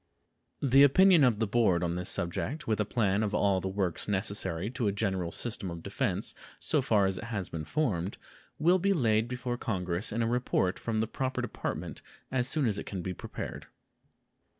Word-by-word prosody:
The 135 0 +6
opinion 170 +4 +7
of 120 -5 +4
the 110 - +1
Board 100 -5 +2
on 85 -1 0
this 90 +1 -2
subject, 135 - -2
with 110 -1 +1
a 105 - +2
plan 105 -2 +1
of 105 -2 -1
all 100 -2 +2
the 95 - -3
works 95 -3 -2
necessary 100 -1 -1
to 125 -4 -1
a - - +2
general 95 -4 -1
system 110 -3 -3
of 85 -1 -7
defense - - -2 0.3
so - - +1
far 105 -3 +3
as 95 -1 0
it - - -6
has 105 -6 -3
been 80 -2 -5
formed, 100 - -1 0.4
will 175 +5 +4
be 200 +2 +2
laid 110 - +2
before 125 0 -3
Congress 90 -1 -2
in 115 +2 0
a - - +1
report 115 -5 0
from 110 -2 -1
the 110 - 0
proper 130 +2 -2
department 85 - -4 0.3
as 130 -1 +1
soon 145 0 +1
as 105 -3 +1
it - - -6
can 95 -3 -4
be 95 - -3
prepared. - - -7
105 Hz, 195 wpm, -30 LUFS, 95-125 Hz, 0.4 s, opinion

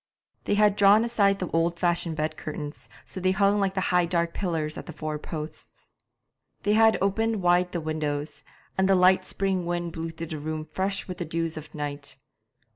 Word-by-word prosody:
They - - +1
had 210 -1 +4
drawn 205 +2 +6
aside 200 -4 +2
the 185 - -3
old 165 +1 +1
fashioned 175 -2 0
bed 155 0 -2
curtains, 150 -1 -7 0.2
so - - -6
that - - -8
they 185 +1 +2
hung 200 +1 +3
like 195 -1 0
high 180 -2 +2
dark 170 -1 0
pillars 160 -5 -2
at - - -8
the 170 - -7
four 155 0 -4
posts. 155 0 -8 0.7
They 205 - +2
had 220 0 +5
opened 220 +1 0
wide 180 0 +3
the 175 - -3
windows, 150 -1 -3 0.4
and 190 0 +3
the 195 - +6
light 185 0 +5
spring 190 -2 -1
wind 175 0 -2
blew 165 +1 -4
through 165 0 -6
the 155 -1 -6
room 155 +1 -4
fresh 190 +5 -2
with 180 -2 -6
the 175 - -2
dews 165 0 -2
of 155 0 -9
night. 145 -1 -5
175 Hz, 200 wpm, -26 LUFS, 155-195 Hz, 0.7 s, drawn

